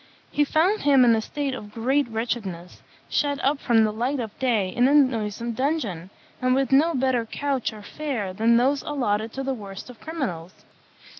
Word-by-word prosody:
He 295 Hz, -, +2 dB
found 355 Hz, +9 st, +2 dB
him 275 Hz, -3 st, +5 dB
in 230 Hz, -1 st, +5 dB
a 220 Hz, -, 0 dB
state 285 Hz, +3 st, -3 dB
of 210 Hz, -5 st, -8 dB
great 260 Hz, +5 st, +1 dB
wretchedness, 220 Hz, -6 st, -4 dB, 0.3 s
shut 285 Hz, -2 st, 0 dB
up 275 Hz, +1 st, +2 dB
from 230 Hz, -4 st, +3 dB
the 215 Hz, -, +1 dB
light 250 Hz, +6 st, -1 dB
of 220 Hz, -4 st, -5 dB
day 225 Hz, -7 st, +1 dB
in 245 Hz, +7 st, +2 dB
a 285 Hz, -, +4 dB
noisome 235 Hz, -4 st, +1 dB
dungeon, 230 Hz, -, -2 dB, 0.3 s
and 255 Hz, 0 st, +3 dB
with 270 Hz, -1 st, 0 dB
no 315 Hz, +5 st, +4 dB
better 255 Hz, -2 st, +1 dB
couch 275 Hz, 0 st, -2 dB
or 215 Hz, -1 st, -11 dB
fare 235 Hz, -7 st, -4 dB
than 230 Hz, +4 st, +3 dB
those 270 Hz, +4 st, +2 dB
allotted 225 Hz, -6 st, -1 dB
to 270 Hz, -, -4 dB
the 270 Hz, 0 st, -1 dB
worst 205 Hz, 0 st, -8 dB
of 240 Hz, -, -18 dB
criminals. 230 Hz, -, -5 dB
245 Hz, 190 wpm, -24 LUFS, 220-280 Hz, 0.3 s, him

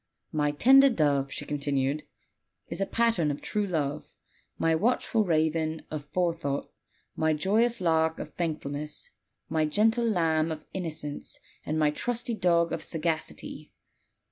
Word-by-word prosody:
My 150 Hz, -1 st, +1 dB
tender 270 Hz, -, +6 dB
dove," 145 Hz, -, +1 dB
she -, -, -4 dB
continued, 140 Hz, 0 st, -1 dB, 0.6 s
"is -, -, -4 dB
a 195 Hz, -, +1 dB
pattern 230 Hz, -9 st, +2 dB
of 145 Hz, -, -3 dB
true 210 Hz, -1 st, -1 dB
love; 150 Hz, -4 st, -3 dB, 0.4 s
my 165 Hz, -, +2 dB
watchful 220 Hz, +4 st, +2 dB
raven 160 Hz, -2 st, 0 dB
of 150 Hz, -2 st, -4 dB
forethought; 165 Hz, -4 st, -1 dB, 0.4 s
my 160 Hz, 0 st, +2 dB
joyous 220 Hz, +9 st, +2 dB
lark 160 Hz, -2 st, +2 dB
of -, -, -7 dB
thankfulness; 150 Hz, -3 st, -4 dB, 0.4 s
my 155 Hz, -1 st, +1 dB
gentle 225 Hz, +7 st, +2 dB
lamb 165 Hz, -4 st, +1 dB
of 155 Hz, -1 st, -6 dB
innocence; 155 Hz, -5 st, -5 dB, 0.2 s
and 155 Hz, -, -2 dB
my 150 Hz, -1 st, +3 dB
trusty 240 Hz, +7 st, -2 dB
dog 170 Hz, -5 st, +2 dB
of -, -, -2 dB
sagacity. 160 Hz, -1 st, -4 dB
160 Hz, 135 wpm, -28 LUFS, 150-190 Hz, 0.6 s, tender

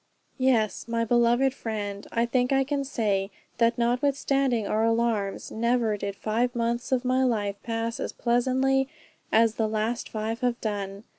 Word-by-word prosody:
Yes, 240 Hz, -6 st, +1 dB
my 230 Hz, 0 st, 0 dB
beloved 240 Hz, +3 st, +3 dB
friend, 205 Hz, -5 st, -5 dB
I 235 Hz, 0 st, +1 dB
think 250 Hz, +1 st, +1 dB
I 270 Hz, 0 st, +4 dB
can 280 Hz, +1 st, -1 dB
say, 205 Hz, -7 st, -1 dB, 0.3 s
that 230 Hz, 0 st, +3 dB
notwithstanding 260 Hz, -1 st, +1 dB
our 215 Hz, +2 st, +1 dB
alarms, 225 Hz, -3 st, 0 dB
never 235 Hz, -1 st, +1 dB
did 200 Hz, -1 st, -4 dB
five 235 Hz, +5 st, -1 dB
months 235 Hz, +2 st, -1 dB
of 255 Hz, -1 st, +1 dB
my 255 Hz, +1 st, +2 dB
life 205 Hz, -5 st, 0 dB
pass 230 Hz, 0 st, -3 dB
as -, -, -3 dB
pleasantly 260 Hz, +3 st, +1 dB, 0.4 s
as 225 Hz, 0 st, +3 dB
the 220 Hz, -, +2 dB
last 220 Hz, +2 st, -2 dB
five 220 Hz, +1 st, -3 dB
have 245 Hz, 0 st, 0 dB
done. 200 Hz, -2 st, -4 dB
235 Hz, 155 wpm, -26 LUFS, 220-250 Hz, 0.4 s, I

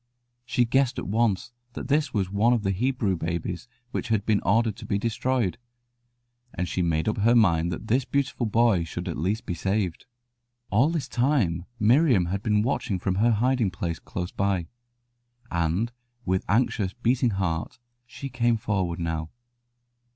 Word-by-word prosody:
She 125 Hz, -2 st, +2 dB
guessed 130 Hz, +2 st, +2 dB
at -, -, -3 dB
once 115 Hz, +1 st, +1 dB, 0.2 s
that -, -, -6 dB
this 145 Hz, -1 st, +1 dB
was 95 Hz, -4 st, -1 dB
one 110 Hz, +5 st, +3 dB
of 115 Hz, -4 st, 0 dB
the 95 Hz, -, +1 dB
Hebrew 115 Hz, -1 st, 0 dB
babies 85 Hz, +4 st, -3 dB, 0.2 s
which -, -, -3 dB
had 110 Hz, -3 st, 0 dB
been 105 Hz, -2 st, +2 dB
ordered 110 Hz, 0 st, +2 dB
to -, -, -9 dB
be 100 Hz, -, +1 dB
destroyed, 115 Hz, 0 st, -1 dB, 1.0 s
and 90 Hz, +1 st, -2 dB
she 90 Hz, -, -1 dB
made 80 Hz, 0 st, 0 dB
up 110 Hz, -, 0 dB
her 115 Hz, +4 st, +4 dB
mind 85 Hz, -7 st, +3 dB
that -, -, -5 dB
this 125 Hz, +4 st, +2 dB
beautiful 135 Hz, -2 st, -1 dB
boy 110 Hz, -5 st, +3 dB
should 85 Hz, +3 st, -6 dB
at 85 Hz, -, -2 dB
least 100 Hz, +9 st, -1 dB
be 90 Hz, -, -2 dB
saved. 95 Hz, 0 st, -2 dB, 0.6 s
All 120 Hz, +9 st, +4 dB
this 160 Hz, -6 st, -2 dB
time 115 Hz, -, +1 dB
Miriam 120 Hz, -, +4 dB
had 95 Hz, +3 st, -2 dB
been 105 Hz, -1 st, +2 dB
watching 110 Hz, -6 st, -1 dB
from 95 Hz, +1 st, -1 dB
her 120 Hz, -, +5 dB
hiding 120 Hz, -1 st, +2 dB
place 90 Hz, -3 st, -4 dB
close 90 Hz, 0 st, -5 dB
by, 95 Hz, -3 st, 0 dB, 0.9 s
and 85 Hz, +7 st, 0 dB, 0.3 s
with 95 Hz, 0 st, 0 dB
anxious, 105 Hz, -3 st, +1 dB
beating 120 Hz, +1 st, +1 dB
heart 85 Hz, -4 st, -2 dB, 0.3 s
she 125 Hz, +3 st, -7 dB
came 120 Hz, -3 st, +1 dB
forward 95 Hz, -6 st, -1 dB
now. 80 Hz, -2 st, -3 dB
105 Hz, 165 wpm, -26 LUFS, 90-120 Hz, 1.0 s, her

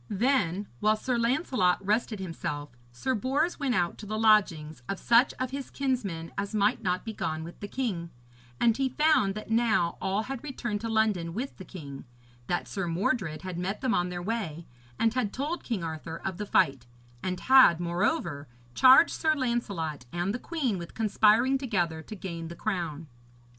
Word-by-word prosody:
Then, 205 Hz, -4 st, +1 dB
while 215 Hz, +1 st, +3 dB
Sir 245 Hz, +3 st, -2 dB
Lancelot 235 Hz, -, +2 dB
rested 215 Hz, +1 st, 0 dB
himself, 150 Hz, -5 st, -5 dB, 0.2 s
Sir 120 Hz, -, -2 dB
Bors 270 Hz, -, 0 dB
went 275 Hz, -4 st, 0 dB
out 175 Hz, -1 st, 0 dB
to 210 Hz, -, -8 dB
the 215 Hz, +1 st, -2 dB
lodgings 180 Hz, -, +3 dB
of 195 Hz, -, -1 dB
such 240 Hz, +5 st, +4 dB
of 255 Hz, 0 st, -2 dB
his 275 Hz, 0 st, -5 dB
kinsmen 205 Hz, -12 st, -2 dB
as 200 Hz, +2 st, -3 dB
might 205 Hz, -1 st, +2 dB
not 180 Hz, 0 st, -1 dB
be 220 Hz, -, -4 dB
gone 160 Hz, -5 st, -3 dB
with 170 Hz, +2 st, -10 dB
the 205 Hz, -, -5 dB
king, 200 Hz, -9 st, -3 dB, 0.5 s
and 230 Hz, -2 st, +4 dB
he 270 Hz, +1 st, 0 dB
found 260 Hz, -9 st, +3 dB
that 215 Hz, +1 st, -7 dB
now 220 Hz, -6 st, +2 dB
all 195 Hz, +3 st, 0 dB
had 265 Hz, 0 st, -6 dB
returned 240 Hz, -7 st, -4 dB
to 230 Hz, -, -3 dB
London 210 Hz, -7 st, +1 dB
with 255 Hz, +5 st, -4 dB
the 190 Hz, -, -8 dB
king, 145 Hz, -8 st, -9 dB, 0.4 s
that 175 Hz, -, -1 dB
Sir 195 Hz, -3 st, -3 dB
Mordred 180 Hz, -2 st, -1 dB
had 185 Hz, -2 st, -5 dB
met 190 Hz, +4 st, -3 dB
them 255 Hz, -3 st, +1 dB
on 180 Hz, 0 st, +1 dB
their 175 Hz, 0 st, -5 dB
way, 175 Hz, -7 st, -3 dB, 0.3 s
and 225 Hz, -1 st, +2 dB
had 245 Hz, -5 st, 0 dB
told 300 Hz, +6 st, -3 dB
King 220 Hz, -8 st, -3 dB
Arthur 160 Hz, 0 st, -5 dB
of 190 Hz, -2 st, -3 dB
the 210 Hz, -, -4 dB
fight, 135 Hz, -8 st, +2 dB, 0.3 s
and 185 Hz, -1 st, -3 dB
had, 260 Hz, -11 st, +7 dB
moreover, 170 Hz, -4 st, -1 dB, 0.3 s
charged 260 Hz, -, +7 dB
Sir 315 Hz, -1 st, +1 dB
Lancelot 200 Hz, -, -2 dB
and 175 Hz, +3 st, -1 dB
the 245 Hz, -, -3 dB
queen 265 Hz, -, -2 dB
with 170 Hz, -, -9 dB
conspiring 225 Hz, +4 st, +3 dB
together 175 Hz, -11 st, -1 dB
to 215 Hz, -, -9 dB
gain 170 Hz, -4 st, -6 dB
the 170 Hz, -, -8 dB
crown. 170 Hz, -6 st, -3 dB
205 Hz, 185 wpm, -28 LUFS, 170-240 Hz, 0.5 s, had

